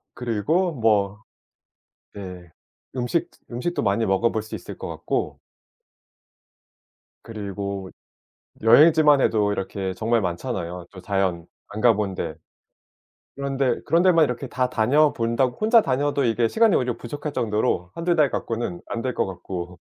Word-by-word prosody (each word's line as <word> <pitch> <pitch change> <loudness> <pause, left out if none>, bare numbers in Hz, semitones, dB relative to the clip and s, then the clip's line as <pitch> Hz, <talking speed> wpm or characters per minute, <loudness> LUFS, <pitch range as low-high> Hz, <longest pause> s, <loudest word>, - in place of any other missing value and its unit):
그리고 135 - 0
뭐 105 -3 +1 0.9
네 90 -3 -8 0.5
음식 130 +6 -1
즈 - - -25
음식도 125 +9 -2
많이 105 +2 +1
먹어볼 110 +4 +1
수 110 - -9
있을 - - -8
것 - - -6
같고 - - -3 1.8
그리고 100 -3 -5 0.7
여행지만 150 +4 +6
해도 105 -4 +2
이렇게 95 -1 -3
정말 115 +4 +1
많잖아요 90 -1 -4
저 95 - -11
자연, 95 -3 -1 0.2
안 105 +1 -6
가 120 -1 +6
본 100 -2 -2
데 80 -3 -4 1.0
그런 140 0 -4
데 130 -3 +1
그런 170 +1 +3
데만 170 -4 +5
이렇게 125 0 -3
다 125 0 0
다녀 140 +7 +3
본다고 115 +2 0
혼자 225 +1 +5
다녀도 140 -1 0
이게 115 0 +2
시간이 220 -4 +3
오히려 125 -2 -1
부족할 145 +5 -6
정도로 105 -7 -1
1-2 170 +1 0
달 150 -4 +3
갖고는 115 -7 -3
안 115 - -3
될 130 -1 -2
것 - - 0
같고. 90 -1 -7
115 Hz, 275 characters per minute, -23 LUFS, 100-140 Hz, 1.8 s, 여행지만